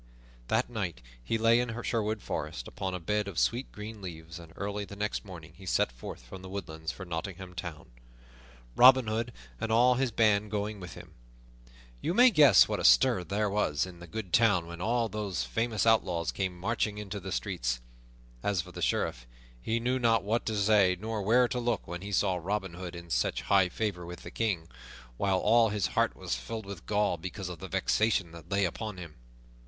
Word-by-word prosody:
That 110 +3 +1
night 95 - -4 0.2
he 115 - 0
lay 115 +1 +4
in 120 -1 -2
Sherwood 110 -2 -1
Forest - - -4
upon 95 -1 -4
a - - -4
bed 105 +4 -1
of 95 -5 -7
sweet 120 - +1
green 105 0 -8
leaves, 85 -2 -8
and 85 -2 -12
early 100 +1 -3
the 100 - -9
next 105 +1 -2
morning 85 -7 -11
he 95 +1 -12
set - - +2
forth - - -9
from 75 +10 -10
the 95 - -9
woodlands 80 -5 -5
for 95 - -9
Nottingham 90 +2 -5
Town, 85 -6 -7 0.8
Robin 130 0 +8
Hood 110 +2 -2 0.3
and 110 - -2
all 120 +3 +5
of 125 - -2
his 135 -2 +2
band 105 -2 +2
going 105 0 -3
with 90 -1 -9
him. - - -12 0.9
You 175 - -1
may 250 +2 +7
guess 145 - +7
what - - -2
a - - -3
stir 65 +9 +5
there 105 +3 0
was 100 -8 +1
in 90 -2 -11
the 85 - -10
good 105 -1 -6
town 105 -7 +4
when 85 +1 -8
all 115 +3 +1
these 105 -3 -3
famous 115 -2 -1
outlaws 90 -7 +2
came 95 -2 -3
marching 105 +1 -1
into 105 -1 -5
the 90 - -7
streets. - - -2 0.6
As 95 0 0
for - - -12
the - - -8
Sheriff, - - -1 0.3
he 115 - 0
knew 125 +2 0
not 115 -4 +3
what 110 +4 -1
to 110 -1 -1
say 100 -3 +4
nor 110 +1 -3
where 120 +5 +4
to 125 - -2
look 120 -4 -1
when 85 0 -5
he 100 +1 -6
saw 95 -2 +2
Robin 95 +1 -3
Hood 90 0 -7
in 85 -1 -9
such - - 0
high 95 -2 +4
favor 100 -2 -2
with 85 +1 -9
the - - -8
King, 95 -8 -1 0.5
while 95 -2 +2
all 115 +3 +4
his 105 -2 0
heart - - +2
was - - -4
filled 100 - -5
with 100 -4 -9
gall 105 -4 +1
because 90 +2 -6
of 90 -3 -7
the - - -7
vexation 105 -6 +1
that 85 0 -12
lay 100 0 +2
upon 105 +2 -4
him. 85 -4 -9
100 Hz, 205 wpm, -30 LUFS, 90-110 Hz, 0.9 s, Robin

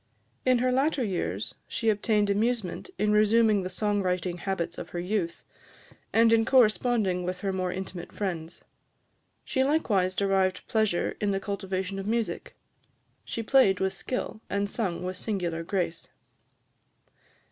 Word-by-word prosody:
In 255 -1 +5
her 255 +1 +2
latter 270 +1 +2
years, 195 -5 -2
she 225 -2 +1
obtained 210 0 +1
amusement 225 - -1
in 210 0 +2
resuming 215 0 +4
the 185 - -4
song 205 +2 0
writing 180 -1 -1
habits 175 -3 -3
of 165 - -7
her 175 - -4
youth, 180 -1 -2 0.7
and 230 0 +5
in 225 0 +5
corresponding 220 -6 +3
with 180 +1 -4
her 195 -1 -1
more 185 -1 -1
intimate 185 -1 -6
friends. 175 -5 -4 0.8
She 265 - +1
likewise 210 -11 +1
derived 195 -1 +1
pleasure 215 -6 +1
in 205 - +1
the 195 -1 +1
cultivation 195 -1 -3
of 195 - -5
music: 230 0 -2 0.7
she 230 - -4
played 215 -6 +4
with 190 0 0
skill, 220 +2 -4
and 200 0 0
sung 195 -5 -2
with 185 0 -3
singular 180 -5 -2
grace. 170 -1 -2
200 Hz, 145 wpm, -28 LUFS, 185-225 Hz, 0.8 s, In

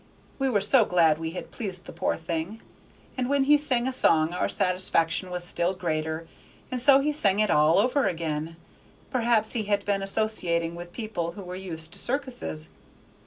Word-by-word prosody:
We 270 0 +1
were 210 -5 +2
so 230 +4 +5
glad 165 -5 +3
we 165 0 -4
had 180 - -7
pleased 190 -5 -5
the - - -9
poor - - -1
thing; 165 +6 -4 0.6
and 255 -1 -2
when 280 -1 +3
he 295 +2 +6
sang 260 -4 +2
a 260 - -2
song 160 -8 +3
our 180 - -1
satisfaction 180 -1 0
was 180 0 -3
still 175 +1 0
greater, 160 -2 -3 0.4
and 250 -1 -1
so 275 +1 +6
he 300 +2 0
sang 205 -9 +2
it 215 -1 +2
all 150 +2 +4
over 250 +4 +2
again. 165 -2 -3 0.6
Perhaps 230 -4 +2
he 225 -4 -2
had 205 -1 0
been 200 -1 0
associating 195 -5 -1
with 175 0 -9
people 175 -6 -4
who 200 - -9
were 180 0 -7
used 165 -3 -5
to - - -8
circuses. 240 - -3
190 Hz, 185 wpm, -26 LUFS, 165-235 Hz, 0.6 s, he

